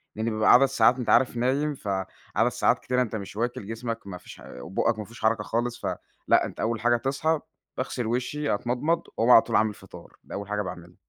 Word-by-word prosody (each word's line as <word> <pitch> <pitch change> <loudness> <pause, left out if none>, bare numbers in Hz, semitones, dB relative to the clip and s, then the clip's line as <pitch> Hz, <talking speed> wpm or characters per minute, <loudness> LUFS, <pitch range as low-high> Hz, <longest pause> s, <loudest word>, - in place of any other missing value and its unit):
لإني 110 +1 -1
بابقى 110 +1 +4
عدد 130 +3 +7
ساعات 125 -2 +3
أنت 125 - -3
عارف 125 -2 +4
نايم 140 +5 0
ف 110 - -11 0.5
عدد - - +3
ساعات - - +1
كتيرة 125 0 0
أنت 115 -2 -2
مش 100 -1 -6
واكِل، 115 -2 -2
جسمك 115 -1 -5
ما 90 -2 -6
فيش 90 - -13
حا 60 - -11
وبوقك 110 - -1
ما 105 - -5
فيهوش 115 +2 -14
حركة 110 -1 +2
خالص، 120 +2 -2
ف - - +1 0.4
لأ، - - +4
أنت - - -9
أول 115 -1 -1
حاجة 120 +1 +3
تصحى، 140 +5 0 0.4
باغسل 125 -2 -3
وشِّي، 130 +5 -1
أتمضمض، 125 +10 0 0.2
وأقوم 115 +2 +2
علي 115 - +9
طول - - -3
عامل 110 -1 +3
فِطار، 95 -4 -14
ده - - -11
أول 100 0 -5
حاجة 105 0 -1
باعملها. 85 -2 -8
115 Hz, 220 wpm, -26 LUFS, 105-125 Hz, 0.5 s, علي